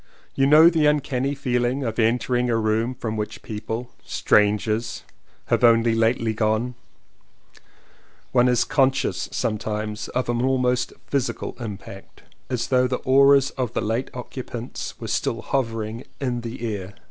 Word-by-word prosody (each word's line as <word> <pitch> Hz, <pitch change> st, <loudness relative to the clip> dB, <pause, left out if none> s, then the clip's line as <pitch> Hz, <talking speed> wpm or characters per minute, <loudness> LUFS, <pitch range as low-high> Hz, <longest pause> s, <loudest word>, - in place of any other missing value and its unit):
You 135 Hz, -, +2 dB
know 155 Hz, +3 st, +8 dB
the 160 Hz, -3 st, +4 dB
uncanny 140 Hz, -2 st, 0 dB
feeling 125 Hz, 0 st, 0 dB
of 115 Hz, -2 st, -3 dB
entering 120 Hz, +2 st, +1 dB
a 115 Hz, -, +2 dB
room 110 Hz, +3 st, 0 dB
from 110 Hz, -3 st, -4 dB
which 110 Hz, +1 st, -5 dB
people 110 Hz, +3 st, -5 dB
— -, -, -33 dB
strangers 105 Hz, +2 st, +1 dB, 0.2 s
— -, -, -36 dB
have -, -, +2 dB
only 115 Hz, -1 st, +5 dB
lately 115 Hz, 0 st, +1 dB
gone: 110 Hz, +3 st, 0 dB, 1.6 s
one 125 Hz, -1 st, +4 dB
is 125 Hz, -1 st, +3 dB
conscious 135 Hz, -2 st, +1 dB
sometimes 105 Hz, 0 st, -3 dB
of 125 Hz, +1 st, -2 dB
almost 125 Hz, +1 st, +1 dB
a -, -, -17 dB
physical 140 Hz, -2 st, -2 dB
impact 100 Hz, -4 st, -9 dB, 0.3 s
as 125 Hz, -2 st, -2 dB
though 125 Hz, -1 st, +3 dB
the 125 Hz, 0 st, -1 dB
auras 140 Hz, +1 st, +5 dB
of 125 Hz, -3 st, -3 dB
the -, -, -1 dB
late 115 Hz, +5 st, -1 dB
occupants 125 Hz, -1 st, -6 dB
were -, -, -6 dB
still 115 Hz, -, -1 dB
hover 115 Hz, -5 st, -1 dB
ing 110 Hz, +3 st, -7 dB
in 125 Hz, -3 st, -2 dB
the 120 Hz, 0 st, -6 dB
air. 95 Hz, 0 st, -8 dB
120 Hz, 150 wpm, -23 LUFS, 110-130 Hz, 1.6 s, know